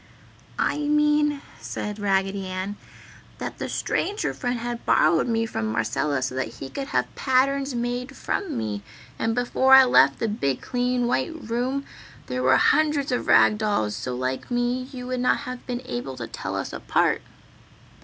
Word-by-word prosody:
"I 295 - 0
mean," 295 -1 +2 0.2
said 210 0 -5
Raggedy 195 -1 0
Ann, 185 +2 -4 0.6
"that - - -6
the - - -3
Stranger 410 +2 -1
Friend 245 0 -2
had 240 0 -4
borrowed 160 +5 +3
me 225 -1 +1
from 110 - -3
Marcella 130 +5 0
so 130 - -2
that 130 -3 -3
he 135 +2 -8
could 275 -1 -4
have - - -1
patterns 270 +1 +1
made 245 +3 -3
from 390 -5 -2
me. 105 -2 -3 0.4
And 225 0 0
before 260 +2 +5
I 265 - +10
left 140 - +5
the 230 - -1
big 140 -11 -1
clean 250 0 0
white 255 +7 0
room 255 +1 -2 0.4
there 125 0 -3
where 130 +1 +5
hundreds 295 -2 +3
of 250 - -1
rag 210 - +5
dolls 205 - 0
so 125 +3 -4
like 130 +1 -3
me 245 +1 -1
you 250 -3 -7
would 255 0 -2
not 250 - +2
have 255 -3 -7
been 245 0 -3
able 125 +2 -5
to 120 - -4
tell - - -5
us - - -4
apart." - - +1
240 Hz, 170 wpm, -24 LUFS, -, 0.6 s, I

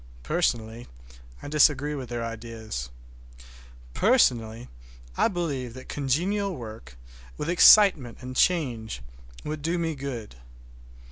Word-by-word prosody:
Personally, 110 - -1 0.6
I - - -6
disagree 150 0 +3
with 130 -5 -6
their 120 -1 -3
ideas. 110 - -6 1.0
Personally, 120 - +2 0.5
I - - +3
believe 145 - -3
that 130 - -11
congenial 180 +8 -1
work, 110 - -10 0.4
with 165 - -2
excitement 175 - +6
and 130 0 -8
change, 120 - 0 0.4
would 155 0 -5
do 165 +4 -1
me 165 -1 -1
good. 130 - -7
130 Hz, 110 wpm, -26 LUFS, 115-160 Hz, 1.0 s, excitement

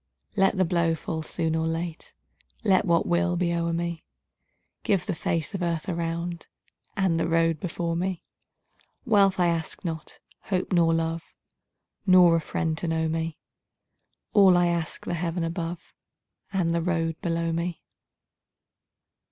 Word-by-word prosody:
Let 195 0 +3
the 185 - +3
blow 170 -1 +1
fall 160 0 -4
soon 160 0 -1
or 160 0 0
late, 165 0 -4 0.5
Let 195 -2 +3
what 170 -2 +3
will 175 +1 +1
be 170 -1 +1
o'er 170 0 0
me; 170 0 -3 0.8
Give 190 -3 +1
the 195 - -1
face 160 -1 -2
of 195 - -3
earth 170 0 -1
around, 170 -1 -3 0.5
And 185 -4 +2
the 165 - +1
road 165 -1 +2
before 170 -1 -2
me. 180 0 -2 0.8
Wealth 200 -5 +4
I 180 - +4
ask 165 +1 -2
not, 160 -2 -5 0.3
hope 185 -2 -1
nor 170 -2 +4
love, 165 0 -1 0.8
Nor 180 -2 +7
a 165 - +1
friend 160 +1 -1
to 175 - -3
know 160 0 0
me; 160 0 -2 1.0
All 190 -3 +7
I 175 0 +3
ask, 170 -1 -3
the - - -2
heaven 170 0 -2
above 170 0 -4 0.6
And 185 -4 +1
the 170 0 +1
road 165 -2 -1
below 165 -1 -1
me. 170 +1 -3
170 Hz, 150 wpm, -26 LUFS, 165-180 Hz, 1.0 s, Nor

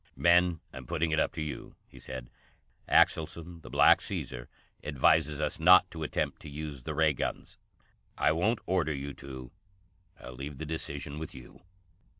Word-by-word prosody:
"Men, 85 -1 +4
I'm 65 -2 -9
putting 80 +4 0
it 80 - +2
up - - +2
to 80 - -3
you," 75 - -7
he - - -15
said. 65 -2 -7 0.6
"Axelson, 85 +1 +2
the - - -11
Black - - +6
Caesar, - - -5 0.3
advises 75 +1 +2
us 75 +1 -2
not 90 +2 +7
to 80 - -7
attempt 80 - -2
to 75 - -9
use 75 -2 -6
the 75 +4 -5
Ray 80 -1 +4
guns. - - -4 0.6
I - - +3
won't 105 +9 +1
order 85 -5 +1
you 70 +1 -5
to. 65 -2 -9 0.7
I'll 65 - -9
leave 70 +3 -7
the 80 - -5
decision 75 -2 -4
with 80 - -7
you." 60 -2 -13
75 Hz, 165 wpm, -30 LUFS, 70-80 Hz, 0.7 s, not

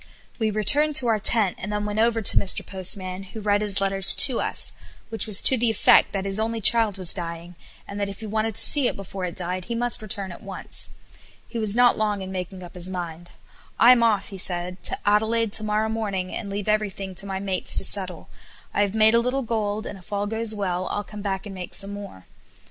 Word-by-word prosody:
We 220 -1 0
returned 285 +9 +2
to 265 - +4
our 220 -1 +1
tent 205 -2 +1
and 210 - -6
then 210 0 -3
went 210 +1 -3
over 225 0 +1
to - - +4
Mr. 195 - +1
Postman, 185 0 -3
who 195 +3 -10
read 205 -1 0
his 205 -2 0
letter 195 0 -2
to 230 +5 +7
us, - - 0 0.4
which 225 0 -4
was 210 -3 +7
to 260 - +4
the 235 0 +2
effect 220 - +4
that 195 -1 -4
his 195 +1 0
only 225 +1 -2
child 220 -2 +3
was 185 -3 +6
dying, 170 -1 -7 0.3
and 200 - -7
that 200 -1 -2
if 195 - -9
he 220 - -8
wanted 220 0 -3
to - - +7
see 285 -4 +5
it - - -2
before 195 -1 -7
it 175 - -6
died 180 0 -4
he 235 - -5
must 240 0 -1
return 195 -2 -5
at 175 - -12
once. 195 -1 -4 0.6
He 235 - -6
was 215 -1 +1
not 245 -1 +3
long 210 -2 -1
in 190 - -8
making 185 0 -7
up 175 - -12
his 180 0 -2
mind. 175 -2 -7 0.5
"I'm 240 0 +6
off," 215 -3 0
said 180 -1 -1
he - - -2
"to - - -3
Adelaide 220 +1 +1
to 215 - +3
morrow 215 +1 -1
morning, 205 -5 -4
and 205 - -6
leave 200 +1 -5
everything 200 -3 -2
to 195 +2 -2
my 190 -1 -4
mates 190 -2 0
to - - +2
settle. 185 -3 +1 0.5
I - - 0
have 205 0 -1
made 220 0 +4
a 235 - +4
little 250 +3 -2
gold, 215 -2 -3
and 195 - -8
if 185 - -19
all 205 0 -2
goes 220 +1 -2
well 185 -3 -3
I'll 205 - -4
come 210 0 -10
back 195 -1 -4
and 205 - -8
make 185 -2 -7
some 200 0 -3
more." 200 - -10
205 Hz, 235 wpm, -23 LUFS, 190-220 Hz, 0.6 s, to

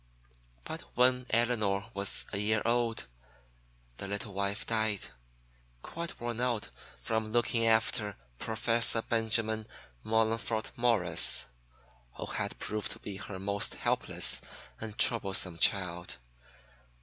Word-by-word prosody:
But - - -6 0.2
when 125 0 +4
Elinor 110 -4 +1
was 100 0 +2
a 100 - -1
year 105 +1 +1
old, 115 -1 +1 0.9
the 100 - -6
little 100 +1 -4
wife 100 +1 -2
died, 110 -3 0 0.7
quite 170 0 -6
worn 120 0 -3
out 120 -4 -1 0.3
from 110 -1 -2
looking 115 0 +2
after 110 -2 +2 0.2
Professor 115 0 +2
Benjamin 110 -1 +2 0.4
Mollingfort 110 0 0
Morris, 110 -9 +3 0.7
who - - -5
had - - -4
proved 105 0 -3
to - - -13
be 100 -2 -7
her 100 -1 -7
most 100 +1 -1
helpless - - +2 0.4
and 110 -1 -7
troublesome 95 -6 +2
child. 90 -2 0
110 Hz, 115 wpm, -31 LUFS, 100-115 Hz, 0.9 s, when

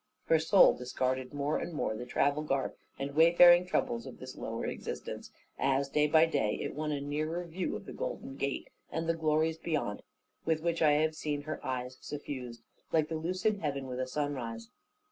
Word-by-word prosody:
Her 160 - +4
soul 180 +5 +6
discarded 130 +1 -2
more 145 +1 -1
and 175 - -5
more 130 -7 -1
the 125 +3 -6
travel 145 +1 +2
garb 135 -3 -1 0.2
and 140 +1 -4
wayfaring 175 +3 +7
troubles 120 -9 -1
of - - -9
this - - -9
lower - - -4
existence, - - -5 0.3
as, 135 0 +1
day 150 +1 +3
by 160 +1 +6
day, 140 -10 0
it - - -3
won 150 +1 -2
a 145 - -1
nearer 155 +5 -2
view 170 +2 -3
of - - -7
the - - -8
golden - - -5
gate, 140 0 -3 0.2
and 165 +1 -2
the 165 - +3
glories 160 0 +1
beyond; 150 -12 -2 0.4
with 160 -1 +1
which 170 -1 0
I 150 -2 +6
have 155 +1 +2
seen 150 -2 -3
her 155 0 -5
eyes 130 0 -4
suffused, 125 -5 -6 0.3
like 155 -2 +2
the 165 - -2
lucid 185 +6 0
heaven 140 -4 -2
with 130 0 -3
sunrise. 120 -6 -3
150 Hz, 185 wpm, -31 LUFS, 135-160 Hz, 0.4 s, wayfaring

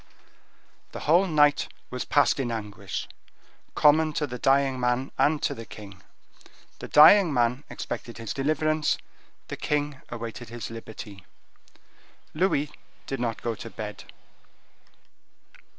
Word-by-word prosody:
The - - -6
whole 175 +6 +4
night 150 -3 +3 0.2
was 125 - -4
passed 145 0 +3
in 125 -3 -1
anguish, 105 -3 -5 0.7
common 155 +1 +4
to 150 - 0
the 125 -3 -7
dying 135 -1 +2
man 125 +2 0
and 150 +1 +3
to - - +1
the 115 - -8
king: 100 -4 -12 0.8
the - - -7
dying 170 +4 +7
man 125 +1 +1
expected 120 - -6
his 115 -2 -5
deliverance, 155 +2 +1 0.5
the - - -5
king 145 -2 -2
awaited 115 0 -7
his 115 -1 -7
liberty. 110 -3 -9 1.1
Louis 150 -4 +1 0.3
did 135 - -4
not 115 -2 -3
go 115 - -1
to 115 +1 -8
bed. 105 -2 -7
130 Hz, 125 wpm, -26 LUFS, 115-150 Hz, 1.1 s, dying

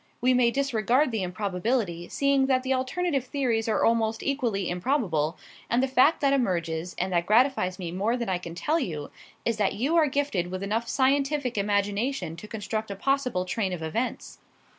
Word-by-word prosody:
We 255 +1 +3
may 250 -1 +4
disregard 255 +1 +1
the 220 -3 -1
improbability, 185 0 -2
seeing 275 -1 +2
that 260 -1 +2
the 260 0 +1
alternative 275 +2 -1
theories 250 -4 -1
are 215 - +2
almost 225 -1 +1
equally 235 -9 -1
improbable, 175 - 0 0.3
and 240 +2 +2
the - - +2
fact 265 +5 +4
that 275 -1 +3
emerges, 175 -8 -1
and 185 +1 -1
that 170 0 +1
gratifies 220 -5 +3
me 175 -3 -5
more 205 +7 0
than 235 -2 -3
I 185 -2 0
can 170 -2 -8
tell 310 - 0
you, 155 - -4 0.3
is 230 -2 0
that 205 -2 +1
you 275 +10 0
are 315 -2 +5
gifted 265 -11 -1
with 185 +1 -4
enough 225 +4 -1
scientific 275 -1 +1
imagination 205 - 0
to 210 - -9
construct 215 0 -4
a 200 - -4
possible 250 -5 0
train 190 0 -1
of 165 -3 -5
events. 225 +11 -3
225 Hz, 185 wpm, -27 LUFS, 185-265 Hz, 0.3 s, are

